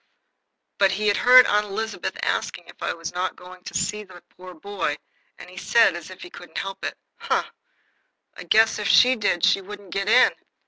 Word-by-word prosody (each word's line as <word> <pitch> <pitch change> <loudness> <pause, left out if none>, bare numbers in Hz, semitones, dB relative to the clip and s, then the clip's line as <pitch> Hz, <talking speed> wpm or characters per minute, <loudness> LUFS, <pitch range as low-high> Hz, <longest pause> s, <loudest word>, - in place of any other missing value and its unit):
But 195 -1 +3
he 210 +1 -2
had 205 - +1
heard 250 +1 +7
Aunt 210 0 +1
Elizabeth 220 +2 -5
asking - - -2
if - - -17
I - - -1
were 165 - -17
not 180 +1 -3
going 180 0 -14
to - - -9
see 210 0 -2
that 185 -3 -16
poor 180 0 -13
dear 160 - -20
boy, 195 -6 -3 0.4
and - - -12
he 185 +1 -15
said, 230 -1 +3
as 170 -1 -9
if 185 - -11
he 175 - -11
couldn't 175 - -11
help 195 0 -6
it: - - -4 0.2
"Huh! - - -1 0.9
I - - -10
guess 220 0 +3
if 210 - -3
she 250 +7 +5
did 205 -6 0
she 195 - +2
wouldn't 200 -1 -11
get 195 +1 -2
in. 250 +3 +5
195 Hz, 210 wpm, -23 LUFS, 180-210 Hz, 0.9 s, heard